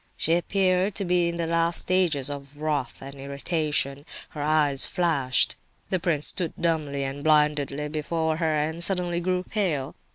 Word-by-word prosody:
_" - - -38
She 165 - +1
appeared 185 +2 +1
to 200 - -1
be 175 -1 +2
in 170 - -4
the 170 - -1
last 165 +1 +2
stages 165 -7 +1
of 140 0 -8
wrath 150 -5 -2
and 135 +1 -8
irritation; 140 0 -2 0.3
her 150 - -7
eyes 150 -2 +2
flashed. 140 -8 +1 0.3
The 185 - +1
prince 160 -4 0
stood 175 -4 -1
dumbly 155 -4 0
and 135 +1 -4
blindly 150 -1 +2
before 160 +1 -1
her, 160 -2 +1
and 160 +3 0
suddenly 175 -1 +4
grew 180 +1 0
pale. 165 -11 -2
155 Hz, 165 wpm, -26 LUFS, 145-175 Hz, 0.3 s, suddenly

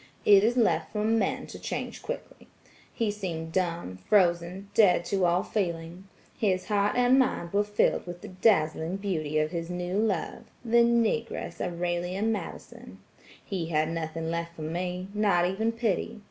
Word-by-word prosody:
It 200 -1 +7
is 235 +3 +2
left 230 -3 +2
for 210 -1 -1
men 220 -2 +1
to - - -10
change - - -5
quickly. - - -7 0.4
He 225 -3 -1
seemed 170 -6 -5
dumb, 170 - -2
frozen, 180 0 +2
dead 180 -5 +4
to 190 -1 +1
all 175 +2 +2
feeling. 175 -2 -3 0.3
His 185 -4 0
heart 205 0 +2
and 250 +2 +5
mind 175 -9 0
were 205 +1 +3
filled 205 -3 +1
with 175 0 -7
the - - -8
dazzling 180 -3 +2
beauty 160 -7 -2
of 155 0 +1
his 170 -1 -4
new 180 +2 -2
love–the 225 +3 -1
Negress 235 -1 0
Aurelia 175 +2 -2
Madison. 225 -1 -4 0.5
He 180 -5 -3
had 155 -1 +1
nothing 165 0 -3
left 170 0 -4
for 155 - -7
me–not 180 +3 0
even 220 +5 0
pity. 230 -1 -2
185 Hz, 150 wpm, -28 LUFS, 170-210 Hz, 0.5 s, It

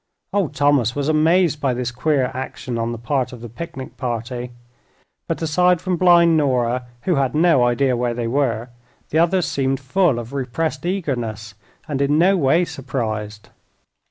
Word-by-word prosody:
Old 185 -8 0
Thomas 145 -5 +2
was 145 0 -1
amazed 155 0 +3
by 130 -3 +1
this 120 -1 -2
queer 135 +1 0
action 130 -2 -5
on 115 +1 -1
the 120 - -5
part 130 +2 -1
of 125 -2 -10
the 120 - -7
picnic 135 +1 -8
party, 120 0 -4 0.8
but - - -2
aside 180 +3 +3
from 180 +1 -1
blind 170 -1 +5
Nora, 125 -3 0 0.2
who 180 -5 +1
had 135 0 0
no 160 -5 +4
idea 125 +2 +2
where 120 0 -1
they 120 -1 -3
were, 120 -2 -1 0.4
the 155 - +2
others 175 +2 +2
seemed 135 -1 -1
full 145 +1 +1
of 120 +2 -7
repressed 140 +6 -2
eagerness, 120 - -3 0.3
and 140 -3 -2
in 145 +2 +2
no 185 +4 +4
way 165 +2 +3
surprised. 110 -7 -5
135 Hz, 165 wpm, -21 LUFS, 120-160 Hz, 0.8 s, blind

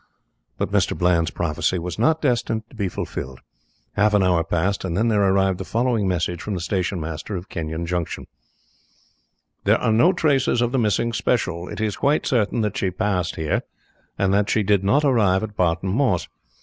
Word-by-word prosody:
But - - -2
Mr. - - +1
Bland's 85 -2 +2
prophecy 85 +2 -1
was 85 -1 -5
not 160 0 +2
destined 115 -4 0
to - - -15
be 100 -4 -1
fulfilled. 65 -6 -6 0.5
Half 105 +1 +3
an 100 - +4
hour 90 -2 +3
passed, 90 +4 -1
and 90 -2 -2
then 115 +3 +2
there 105 -2 +2
arrived 95 -1 +2
the - - -3
following 115 -1 0
message 90 -1 -1
from 105 - -3
the - - -3
station 90 +1 -1
master 80 +5 -5
of 90 +2 -7
Kenyon 80 0 -4
Junction 85 -1 -3 1.4
"There - - +4
are 115 - 0
no 140 +12 +5
traces 145 -8 +1
of 120 0 +1
the 135 - +1
missing 115 +1 +1
special. 90 -7 -1
It - - -6
is 105 -2 -1
quite 145 +2 +1
certain 115 -3 +1
that 105 -2 -2
she 95 - 0
passed 90 -2 -1
here, 80 -1 -1 0.6
and 100 -1 +1
that 100 0 +2
she 110 - +2
did 100 -1 +2
not 140 +10 +3
arrive 110 -8 +3
at 105 -1 -6
Barton 90 0 0
Moss. 110 -6 +1
100 Hz, 190 wpm, -22 LUFS, 90-115 Hz, 1.4 s, no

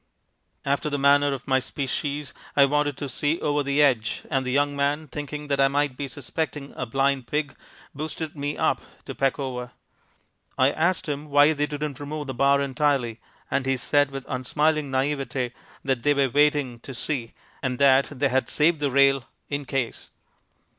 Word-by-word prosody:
After 140 +2 0
the 145 - -1
manner 140 +1 +4
of 135 -3 -5
my 130 -1 +3
species 140 +2 -3 0.2
I 140 - +8
wanted 145 0 0
to 145 - -4
see 150 +4 -1
over 145 0 +1
the 140 +1 +2
edge 120 -6 +1
and 135 -2 +1
the 125 - -2
young 145 +1 +2
man, 145 +2 0
thinking 150 +1 -6
that 140 -1 +1
I 135 - +6
might 140 -1 0
be 140 +1 -4
suspecting 145 +2 -4
a 125 - -4
blind 135 +1 +1
pig, 150 -1 -2 0.4
boosted 155 +2 -5
me 145 0 -3
up - - +1 0.2
to - - -5
peck 135 -1 +1
over. 125 -3 -5 0.8
I 130 +2 +4
asked 170 +4 0
him 150 0 -4
why 145 +2 +6
they 150 0 0
didn't 145 -2 -4
remove 150 +1 -5
the 135 - -4
bar 140 +2 +3
entirely 135 -4 0 0.3
and 135 -1 0
he 135 0 +2
said 145 +3 +2
with 135 -1 -7
unsmiling 150 +3 0
naivete 135 -2 -1 0.3
that 135 -3 0
they 145 +3 +3
were 140 -1 +2
waiting 145 -4 +2
"to 135 +2 -9
see" 120 -3 -3 0.3
and 130 -1 -1
that 135 0 +5
they 140 -1 0
had 130 +1 0
saved 160 +1 +3
the 145 -1 +1
rail, 135 -1 +4 0.2
"in 145 -1 -3
case." 130 -3 -3
140 Hz, 180 wpm, -25 LUFS, 135-145 Hz, 0.8 s, I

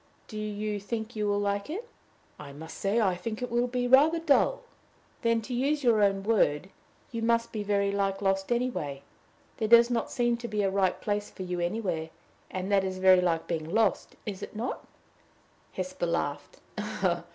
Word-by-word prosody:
"Do 215 - -10
you 210 0 -3
think 220 +3 -5
you 210 -1 -1
will 205 0 +1
like 200 +3 -1
it?" 420 +9 -5 0.5
"I 140 -2 -9
must 160 +3 -9
say, 200 +4 +1
I 190 -5 +2
think 215 +5 -5
it 245 - -4
will 240 +1 +2
be 245 0 -1
rather 290 +6 +6
dull." 330 - +2 0.6
"Then, 230 -1 +1
to 250 - -6
use 280 +4 0
your 230 -4 +4
own 195 -1 +2
word, 190 -5 +1 0.4
you 230 -1 -3
must 230 0 +1
be 215 - -3
very 200 -1 +1
like 195 -1 0
lost 195 +1 0
anyway. 235 - -1 0.5
There 220 - 0
does 235 +2 +7
not 235 - 0
seem 240 -1 +1
to 235 0 -6
be 210 -2 -1
a 195 - +1
right 190 -2 +1
place 205 0 -2
for 190 - -8
you 180 -1 -3
anywhere, 175 -3 -2 0.4
and 185 +2 -4
that 195 -1 +4
is 190 -1 -3
very 185 -1 +6
like 165 -2 0
being 160 -2 -3
lost 220 +2 +1
is 200 -3 -5
it - - -8
not?" 230 +4 -3 0.9
Hesper 185 -2 -3
laughed. 145 -4 -2
205 Hz, 185 wpm, -28 LUFS, 185-235 Hz, 0.9 s, does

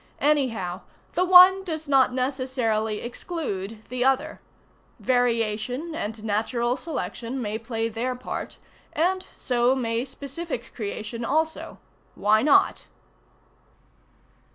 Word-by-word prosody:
Anyhow, 230 -12 +1 0.3
the 360 - +2
one 370 +1 +8
does 320 -4 -5
not 270 -2 +4
necessarily 250 -5 -1
exclude 225 - -5
the 250 -1 -1
other. 270 +4 +1 0.6
Variation 245 +4 0
and 215 -7 -4
natural 230 +3 0
selection 270 -5 -4
may 215 -2 -3
play 225 0 -2
their 235 +3 -2
part, 250 - -6 0.4
and 370 +3 0
so 245 0 +1
may 230 -2 -1
specific 275 0 -6
creation 215 +1 -5
also. 315 +6 -1 0.4
Why 215 +1 +3
not? 285 +3 +3
250 Hz, 105 wpm, -25 LUFS, 225-290 Hz, 0.6 s, one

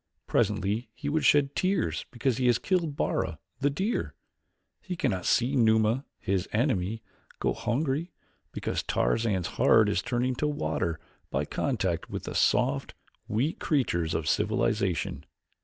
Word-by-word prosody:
Presently 105 +3 0
he 145 - -4
would 155 +1 +1
shed 145 -1 +4
tears 185 - 0
because 125 -1 -1
he 130 -1 +2
has 120 -2 +5
killed 170 -4 0
Bara, - - -1 0.2
the 140 +1 +2
deer. 190 +11 -2 0.7
He 180 - -5
cannot 95 - -1
see 125 +4 +2
Numa, 110 +1 +3
his 95 -1 -1
enemy, 110 -3 0 0.4
go - - +1
hungry, 135 +8 -1 0.4
because - - -2
Tarzan's 95 - 0 0.2
heart 110 -2 +6
is 100 - +1
turning 125 +1 0
to 150 - +1
water 80 - -1 0.3
by - - -1
contact 95 - -1
with - - -5
the - - -5
soft, - - +1 0.3
weak 125 +10 -1
creatures 85 - 0
of 80 - -2
civilization." - - 0
120 Hz, 140 wpm, -28 LUFS, 100-145 Hz, 0.7 s, heart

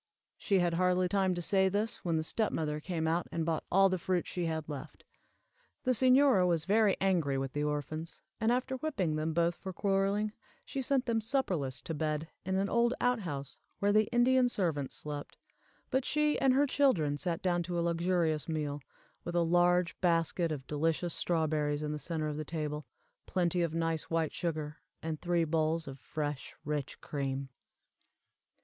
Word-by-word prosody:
She 200 - +1
had 175 -2 +2
hardly 180 +1 +2
time 190 -1 +1
to 175 - -3
say 190 +1 +3
this, 210 +4 -1
when 170 -2 -1
the 160 - 0
step 215 +7 0
mother 150 -1 -2
came 160 0 -2
out, 165 +2 0
and 165 -1 -1
bought 160 -1 -1
all 195 +1 +6
the 185 -1 -1
fruit 180 0 0
she 175 -2 -2
had 160 -1 -3
left. 145 -3 -8 0.8
The 255 - +2
señora 255 -5 +5
was 165 -3 +1
very 210 0 +3
angry 170 -8 +1
with 135 0 -3
the 145 - -1
orphans, 150 +2 -3 0.2
and, 225 0 +2
after 255 +1 0
whipping 200 - -1
them 155 +1 -1
both 170 0 +3
for 190 - -6
quarreling, 200 +2 +1 0.3
sent 270 -1 0
them 230 -2 +1
supperless 180 - -1
to 165 - -4
bed, 155 0 -1 0.2
in 190 +1 -1
an 195 +1 +1
old 235 +3 +2
out 245 -1 +2
house 140 -8 -5 0.2
where 200 0 +2
the 215 0 +4
Indian 245 +1 +4
servants 160 - -1
slept, 145 -1 -6 0.5
but 260 0 +2
she 300 +2 +1
and 270 -1 +5
her 285 +2 +4
children 255 - +2
sat 175 +1 -2
down 175 -2 +2
to 175 0 -3
a - - +1
luxurious 170 -2 +1
meal, 150 -2 -2 0.4
with 175 - -5
a 170 - +4
large 175 +1 +3
basket 170 -1 +2
of 140 -4 -4
delicious 165 +4 0
strawberries 155 -3 0
in 150 - -2
the 150 - -3
center 160 -1 -2
of 150 -1 -3
the 155 - -3
table, 150 -2 -4 0.4
plenty 175 -1 +1
of 165 -1 -1
nice 165 -1 -1
white 165 -2 0
sugar, 155 -3 -3 0.3
and 160 -1 -3
three 175 -1 +2
bowls 160 0 0
of 135 0 -8
fresh, 145 -1 -4
rich 150 -2 -3
cream. 135 -1 -3
170 Hz, 180 wpm, -32 LUFS, 155-195 Hz, 0.8 s, all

